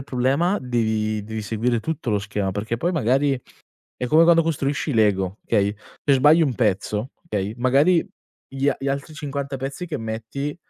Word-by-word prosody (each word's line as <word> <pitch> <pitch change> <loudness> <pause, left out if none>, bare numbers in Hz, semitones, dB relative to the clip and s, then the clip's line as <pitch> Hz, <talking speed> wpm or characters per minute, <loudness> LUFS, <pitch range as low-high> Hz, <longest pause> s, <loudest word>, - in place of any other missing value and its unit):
il - - -6
problema 135 +10 +1
devi 110 -3 -1
devi 110 +1 -5
seguire 115 +3 0
tutto 135 -1 -3
lo 105 - +2
schema, 100 -1 -2
perché 105 +4 -3
poi 170 +9 0
magari 135 -3 +1 0.6
è 125 - -3
come 160 +2 +6
quando 165 -1 +5
costruisci 150 -2 -1
i 135 - -2
Lego, 100 -2 +2
okay, 100 -2 +2 0.3
se 140 - +4
sbagli 150 +5 +5
un 135 -5 +1
pezzo, 105 +2 0 0.2
okay, 105 - -2
magari 140 +8 +4 0.4
gli 135 +1 -1
a 145 - +2
gli 135 - -3
altri 140 +3 -3
50 140 -2 -4
pezzi 135 +7 -5
che 160 - -4
metti 115 +6 -4
130 Hz, 180 wpm, -23 LUFS, 110-145 Hz, 0.6 s, come